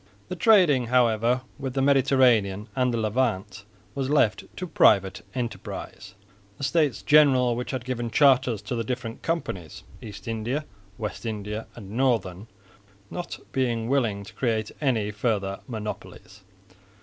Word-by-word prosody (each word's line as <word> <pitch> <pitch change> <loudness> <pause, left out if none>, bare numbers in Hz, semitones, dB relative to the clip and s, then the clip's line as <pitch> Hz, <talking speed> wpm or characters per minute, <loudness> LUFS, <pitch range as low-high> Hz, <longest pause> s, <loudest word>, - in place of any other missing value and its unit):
The - - -3
trading 170 - +4
however 120 0 +2 0.2
with 135 -2 -4
the 135 - +1
Mediterranean 125 -7 +3
and 125 -1 +2
the 115 - -1
Levant 110 -3 -1 0.3
was 135 -1 -2
left 140 -8 +2
to 185 - -3
private 100 - +3
enterprise, 115 -5 -6 0.4
the - - -8
States 145 -1 +1
General 135 -5 +5
which 125 +1 -4
had 130 -3 -4
given 120 -2 -3
charters 130 -4 +3
to - - -4
the 115 -1 -1
different 120 -1 -5
Companies 95 - -4 0.2
East 105 0 -10
India, 115 +7 -2 0.3
West 105 -1 -5
India 105 -1 -4
and 100 -4 -10
Northern 115 -5 0 0.6
not 175 -1 -5
being 120 -3 -1
willing 115 -7 +1
to 110 +3 -12
create 110 -2 -1
any 115 -7 +1
further 100 -3 -1
monopolies. 105 -3 -7
120 Hz, 135 wpm, -25 LUFS, 105-130 Hz, 0.6 s, General